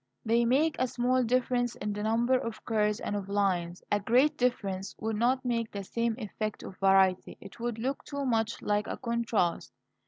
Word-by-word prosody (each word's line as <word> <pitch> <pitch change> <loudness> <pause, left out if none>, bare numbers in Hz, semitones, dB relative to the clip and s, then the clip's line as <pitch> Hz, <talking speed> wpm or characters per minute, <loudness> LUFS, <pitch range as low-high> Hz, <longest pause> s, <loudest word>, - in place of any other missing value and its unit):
They 235 +1 +3
make 295 +6 +2
a 255 - +2
small 250 +1 +1
difference 245 0 +1
in 210 0 -3
the 205 - -4
number 230 +4 +1
of 230 -3 -3
curves 210 -2 +1
and 205 - -3
of 200 -1 -4
lines. 180 -4 0
A 205 - +3
great 250 +8 +3
difference 200 -6 -1
would 220 0 -2
not 255 +4 +1
make 230 -2 0
the 200 -1 -6
same 230 +3 -1
effect 215 -2 -4
of 185 - -10
variety; 190 -1 +3
it 195 - -12
would 235 -1 -2
look 260 +5 -3
too 280 -1 -4
much 225 -2 0
like 210 0 0
a - - -4
contrast. 235 -7 -1
225 Hz, 190 wpm, -29 LUFS, 205-245 Hz, -, They